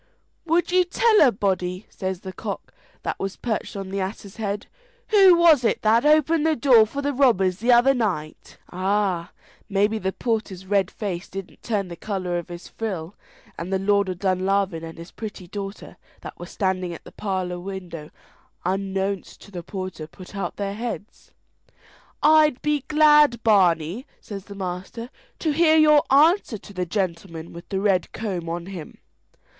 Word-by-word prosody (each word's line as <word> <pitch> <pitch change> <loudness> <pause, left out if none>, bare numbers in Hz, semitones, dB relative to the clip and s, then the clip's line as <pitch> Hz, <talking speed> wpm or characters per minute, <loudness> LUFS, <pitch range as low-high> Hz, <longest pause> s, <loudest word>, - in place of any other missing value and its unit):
"Would 340 +2 +2
you 365 0 +5
tell 430 +5 +3
a 265 - +7
body," 185 -1 -2
says 190 -2 -4
the 190 -1 -7
cock - - -6 0.3
that - - -3
was 195 0 -3
perched 225 -3 -3
on 195 -1 -5
the 195 - -2
ass's 195 +1 -5
head, 205 -2 -3 0.4
"who 390 -4 +7
was 330 -6 +5
it 230 - 0
that 230 +6 +4
opened 310 +1 +4
the 320 0 +2
door 235 -5 +5
for 280 +5 -5
the 285 0 0
robbers 195 -9 +3
the 240 +4 +2
other 245 +3 +6
night?" 190 - -3
Ah! 185 -2 0 0.4
maybe 205 +2 +1
the 190 -1 -1
porter's 210 -5 -3
red 195 -1 +1
face 190 -5 -5
didn't 195 -1 -8
turn 205 -5 -1
the 170 - -7
colour 185 -2 -3
of 170 - -10
his 175 0 -8
frill, 190 -6 -5 0.5
and 175 +3 -5
the 190 - +2
Lord 200 0 +2
of 185 - -4
Dunlavin 190 -2 0
and 165 0 -8
his 170 +1 -10
pretty 210 -4 -8
daughter, 195 +1 -7 0.2
that - - -9
were - - -7
standing 185 -3 -2
at - - -12
the - - -13
parlour 185 -3 -3
window 175 -5 -7 0.6
unknownst 195 +1 -2
to 200 - -14
the 180 -3 -6
porter, 185 -3 -6
put 185 +4 -13
out 195 - -3
their 200 -1 -3
heads. 225 -1 -6 0.9
"I'd 305 -3 +5
be 295 -2 0
glad, 300 -5 +5
Barney," 185 - +2
says 200 -2 -8
the 200 - -10
master, 190 +5 -6 0.3
"to 315 - 0
hear 320 +1 +4
your 300 -1 +6
answer 300 - +4
to 205 - -14
the 180 -2 -3
gentleman 170 -3 -3
with 170 0 -11
the 190 - -1
red 195 -3 +1
comb 185 -7 -4
on 170 0 -4
him." 180 -5 -9
200 Hz, 170 wpm, -23 LUFS, 185-240 Hz, 0.9 s, a